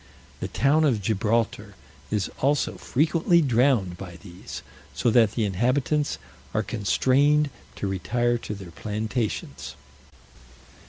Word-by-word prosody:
The -, -, -3 dB
town 150 Hz, +3 st, +2 dB
of 130 Hz, -8 st, +3 dB
Gibraltar 110 Hz, +3 st, 0 dB, 0.3 s
is 105 Hz, -3 st, 0 dB
also 145 Hz, +1 st, +1 dB
frequently 165 Hz, +4 st, +2 dB
drowned 120 Hz, -, +2 dB
by 90 Hz, -3 st, -8 dB
these, 90 Hz, -2 st, -9 dB, 0.3 s
so 120 Hz, -, +2 dB
that 110 Hz, -2 st, +4 dB
the 115 Hz, -, 0 dB
inhabitants 130 Hz, +9 st, +1 dB, 0.4 s
are -, -, +2 dB
constrained 140 Hz, +7 st, +2 dB, 0.2 s
to -, -, -4 dB
retire 120 Hz, +6 st, 0 dB
to 105 Hz, -, -5 dB
their 95 Hz, -4 st, -10 dB
plantations. 110 Hz, +4 st, -3 dB
115 Hz, 115 wpm, -25 LUFS, 105-140 Hz, 0.4 s, that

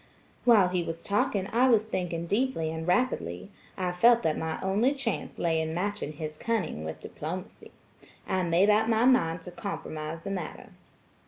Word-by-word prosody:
While 215 Hz, -7 st, +6 dB
he 180 Hz, -1 st, 0 dB
was 165 Hz, 0 st, -5 dB
talking 200 Hz, -1 st, 0 dB
I 250 Hz, +3 st, +4 dB
was 220 Hz, -3 st, +4 dB
thinking 175 Hz, -5 st, -3 dB
deeply 200 Hz, -5 st, 0 dB
and 160 Hz, +1 st, -5 dB
rapidly. 95 Hz, -, 0 dB, 0.3 s
I 180 Hz, -1 st, -1 dB
felt 235 Hz, +6 st, +5 dB
that 155 Hz, -, +1 dB
my 160 Hz, 0 st, -3 dB
only 210 Hz, +9 st, +2 dB
chance 260 Hz, -6 st, -3 dB
lay 165 Hz, -1 st, +1 dB
in 160 Hz, 0 st, -3 dB
matching 190 Hz, -4 st, -2 dB
his 155 Hz, 0 st, -6 dB
cunning 195 Hz, -, -2 dB
with 80 Hz, 0 st, -6 dB
diplomacy. -, -, -7 dB, 0.6 s
I 185 Hz, -, +1 dB
made 180 Hz, +4 st, +4 dB
up 215 Hz, +1 st, +3 dB
my 225 Hz, +1 st, +3 dB
mind 180 Hz, -10 st, +3 dB
to 180 Hz, -, -8 dB
compromise 160 Hz, -4 st, -5 dB
the 195 Hz, -, -4 dB
matter. 180 Hz, -5 st, -5 dB
180 Hz, 170 wpm, -28 LUFS, 160-220 Hz, 0.6 s, While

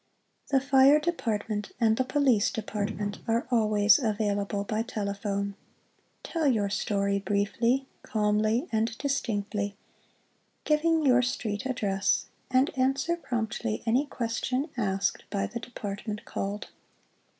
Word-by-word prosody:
Tlie 270 Hz, -1 st, +3 dB
Fire 275 Hz, +2 st, +6 dB
Department 215 Hz, -, -2 dB
and 220 Hz, -2 st, +4 dB
the 260 Hz, -, +1 dB
Police 255 Hz, -5 st, +3 dB
Department 205 Hz, -2 st, -3 dB
are 230 Hz, +1 st, +1 dB
always 215 Hz, 0 st, +5 dB
available 205 Hz, -3 st, -1 dB
by 215 Hz, +2 st, -1 dB
telephone. 200 Hz, -3 st, -3 dB, 0.7 s
Tell 325 Hz, -3 st, -1 dB
your 210 Hz, -6 st, +2 dB
story 200 Hz, -1 st, 0 dB
briefly, 230 Hz, +6 st, +1 dB, 0.2 s
calmly 215 Hz, +5 st, +1 dB
and 220 Hz, 0 st, 0 dB
distinctly, 205 Hz, -7 st, -2 dB, 0.9 s
giving 315 Hz, +1 st, +2 dB
your 250 Hz, -2 st, +5 dB
street 245 Hz, -2 st, -2 dB
address, 200 Hz, -6 st, +1 dB, 0.2 s
and 260 Hz, +4 st, +2 dB
answer 270 Hz, +5 st, +1 dB
promptly 220 Hz, -, -3 dB
any 250 Hz, +6 st, +2 dB
question 255 Hz, +4 st, -2 dB
asked 195 Hz, -4 st, 0 dB
by 200 Hz, -2 st, -1 dB
the 235 Hz, -, -5 dB
Department 210 Hz, -2 st, -6 dB
called. 200 Hz, +2 st, -4 dB
220 Hz, 115 wpm, -28 LUFS, 205-260 Hz, 0.9 s, Fire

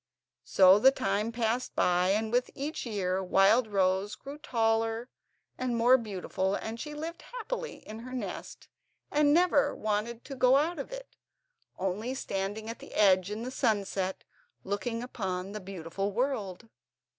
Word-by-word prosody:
So 190 Hz, +1 st, +6 dB
the 265 Hz, -, +8 dB
time 210 Hz, -3 st, -1 dB
passed 235 Hz, +1 st, -1 dB
by, 180 Hz, +1 st, +3 dB
and 215 Hz, +2 st, +1 dB
with 245 Hz, +1 st, +1 dB
each 285 Hz, -1 st, -4 dB
year 190 Hz, -3 st, -1 dB
Wildrose 195 Hz, 0 st, +3 dB
grew 280 Hz, +2 st, -9 dB
taller 225 Hz, -3 st, 0 dB, 0.5 s
and 250 Hz, -2 st, -1 dB
more 240 Hz, +3 st, +6 dB
beautiful, 195 Hz, -4 st, -2 dB
and 225 Hz, +2 st, -5 dB
she 300 Hz, +2 st, -6 dB
lived 325 Hz, +3 st, -6 dB
happily -, -, -6 dB
in 215 Hz, +1 st, -7 dB
her 250 Hz, +2 st, -9 dB
nest 255 Hz, -1 st, -6 dB, 0.4 s
and 295 Hz, 0 st, +4 dB
never 335 Hz, -2 st, +3 dB
wanted 215 Hz, +2 st, -2 dB
to 275 Hz, -, -7 dB
go 255 Hz, 0 st, +5 dB
out 315 Hz, +3 st, +1 dB
of 275 Hz, -, -6 dB
it, -, -, -9 dB, 0.6 s
only 205 Hz, +7 st, -2 dB
standing 205 Hz, -2 st, -3 dB
at 230 Hz, -, -6 dB
the -, -, -11 dB
edge 190 Hz, -2 st, +4 dB
in 215 Hz, +2 st, -4 dB
the 255 Hz, -, -4 dB
sunset, 200 Hz, -6 st, -1 dB, 0.4 s
and 195 Hz, -, -9 dB
looking 230 Hz, +3 st, -2 dB
upon 190 Hz, -6 st, -4 dB
the 210 Hz, 0 st, -6 dB
beautiful 190 Hz, +1 st, -4 dB
world. 230 Hz, -4 st, -2 dB
225 Hz, 155 wpm, -30 LUFS, 195-255 Hz, 0.6 s, the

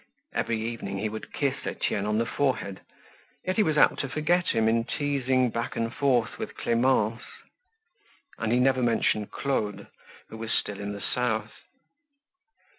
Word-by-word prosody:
Every 115 Hz, -1 st, 0 dB
evening 110 Hz, -3 st, -4 dB
he 110 Hz, +2 st, -1 dB
would 110 Hz, +1 st, -7 dB
kiss 140 Hz, -2 st, 0 dB
Etienne 100 Hz, +1 st, -1 dB
on 105 Hz, 0 st, +1 dB
the 115 Hz, -, +2 dB
forehead, 120 Hz, -8 st, -1 dB, 0.6 s
yet 185 Hz, +2 st, -1 dB
he -, -, +6 dB
was 155 Hz, -6 st, +2 dB
apt -, -, +5 dB
to 135 Hz, -, -2 dB
forget 175 Hz, +5 st, +1 dB
him 110 Hz, -1 st, +2 dB
in 115 Hz, +1 st, +3 dB
teasing 130 Hz, -3 st, +1 dB
back 115 Hz, +1 st, -3 dB
and 115 Hz, 0 st, -1 dB
forth 125 Hz, -5 st, +1 dB
with -, -, -5 dB
Clemence. 115 Hz, -2 st, +2 dB, 1.2 s
And 115 Hz, -1 st, 0 dB
he 120 Hz, -, +4 dB
never 130 Hz, 0 st, +3 dB
mentioned 110 Hz, -3 st, +1 dB
Claude 105 Hz, -8 st, -2 dB, 0.4 s
who 110 Hz, -, -8 dB
was 115 Hz, 0 st, -4 dB
still 100 Hz, -1 st, 0 dB
in 105 Hz, 0 st, -4 dB
the 100 Hz, -, -7 dB
south. 110 Hz, -4 st, 0 dB
115 Hz, 160 wpm, -27 LUFS, 110-135 Hz, 1.2 s, he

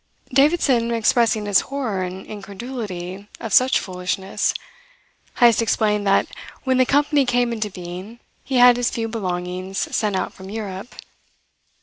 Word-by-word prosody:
Davidson 275 Hz, -4 st, +3 dB
expressing 230 Hz, -1 st, +2 dB
his 205 Hz, -1 st, +4 dB
horror 250 Hz, -9 st, -2 dB
and 185 Hz, +1 st, -5 dB
incredulity 200 Hz, -3 st, -7 dB
of 225 Hz, -4 st, -5 dB
such 260 Hz, +1 st, +5 dB
foolishness, 185 Hz, +1 st, -2 dB, 0.8 s
Heyst 235 Hz, -1 st, +5 dB
explained 210 Hz, -2 st, +1 dB
that 195 Hz, -, +4 dB, 0.4 s
when 260 Hz, -1 st, +1 dB
the 255 Hz, -, +4 dB
company 290 Hz, 0 st, +3 dB
came 245 Hz, -1 st, +1 dB
into 215 Hz, -2 st, -2 dB
being 185 Hz, +5 st, -8 dB, 0.2 s
he 270 Hz, -, -4 dB
had 245 Hz, -1 st, +7 dB
his 245 Hz, -1 st, +1 dB
few 225 Hz, -1 st, -3 dB
belongings 185 Hz, -3 st, -3 dB
sent 210 Hz, -3 st, 0 dB
out -, -, -2 dB
from 190 Hz, 0 st, -11 dB
Europe. 205 Hz, 0 st, -6 dB
220 Hz, 135 wpm, -21 LUFS, 190-245 Hz, 0.8 s, had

